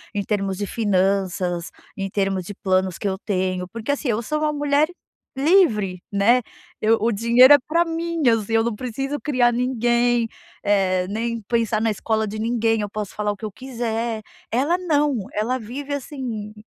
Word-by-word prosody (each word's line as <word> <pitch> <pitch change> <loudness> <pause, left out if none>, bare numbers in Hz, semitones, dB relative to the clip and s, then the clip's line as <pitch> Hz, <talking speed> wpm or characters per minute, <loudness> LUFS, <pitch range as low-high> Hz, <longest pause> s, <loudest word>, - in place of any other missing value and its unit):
em 200 - 0
termos 195 -2 -1
de 205 - -2
finanças, 190 -4 0 0.3
em 195 -1 -3
termos 195 -2 -1
de 205 - -6
planos 185 -2 0
que - - -3
eu 190 - -2
tenho, 185 -3 -1
porque, 230 +4 -3
assim, 285 0 -2
eu 225 0 +1
sou 305 +7 -1
uma 305 0 0
mulher 290 +1 +2 0.5
livre, 240 - +3
né. 215 +5 +4 0.4
Eu 225 +1 +4
o 230 +2 +2
dinheiro 235 +5 +6
é - - +9
pra 335 +2 +3
mim, 335 0 -2
assim, 225 -1 0
eu 225 0 +4
não 235 0 -1
preciso 270 +5 -4
criar 250 -5 +2
ninguém, 240 -1 +1 0.4
eh, 190 -3 +2
nem 230 +2 -2
pensar 225 0 0
na 225 0 +2
escola 220 +1 -1
de 215 +1 -5
ninguém. 225 0 +1
Eu 205 - -3
posso 210 -1 -5
falar 210 0 0
o - - -5
que 195 - -19
eu 215 - -5
quiser. 230 -2 -3 0.3
Ela 285 +9 +2
não, 295 -6 +1 0.2
ela 235 +5 -1
vive, 270 +6 -6
assim, 250 -7 -5
225 Hz, 180 wpm, -22 LUFS, 205-255 Hz, 0.5 s, é